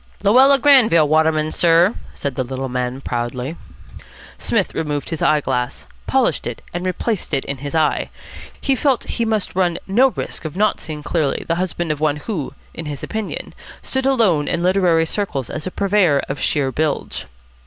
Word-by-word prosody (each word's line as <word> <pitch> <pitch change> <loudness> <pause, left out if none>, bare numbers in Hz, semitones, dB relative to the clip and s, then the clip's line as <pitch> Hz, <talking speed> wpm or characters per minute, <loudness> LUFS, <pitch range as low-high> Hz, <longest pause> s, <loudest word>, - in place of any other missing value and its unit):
"Luella 260 +7 +6
Granville 235 - +6
Waterman, 155 0 +2
sir," 170 +4 +4 0.2
said 140 - -3
the 130 - -1
little 130 +1 -4
man 125 +1 -3
proudly. 125 +4 -3 0.8
Psmith 205 -5 0
removed 150 -2 -3
his 165 - -3
eye 155 -1 +3
glass, 125 -3 -2 0.2
polished - - +1
it, - - -6
and 175 0 -3
replaced 185 -2 -1
it 135 - -1
in 140 -1 -3
his 145 +3 -5
eye. 155 -1 +1 0.5
He 275 - +1
felt 265 -2 +1
that - - -7
he 235 - -1
must 220 -3 -1
run 175 -2 +1
no 235 +8 +4
risk 255 - -5
of 155 +2 -6
not 210 +1 +2
seeing 150 -2 -7
clearly 155 -3 -1
the 165 - +1
husband 175 -3 -2
of 150 - -3
one 150 -1 +1
who, 150 - -5 0.2
in 165 - -6
his 145 -2 -6
opinion, 220 -2 -5 0.3
stood 265 0 -1
alone 205 - +2
in 170 0 -1
literary 180 -3 +3
circles 160 - -3
as 155 +2 -5
a - - -4
purveyor 190 -8 +2
of 135 - -4
sheer 135 -3 0
bilge. 150 - -2
165 Hz, 180 wpm, -20 LUFS, 145-200 Hz, 0.8 s, Luella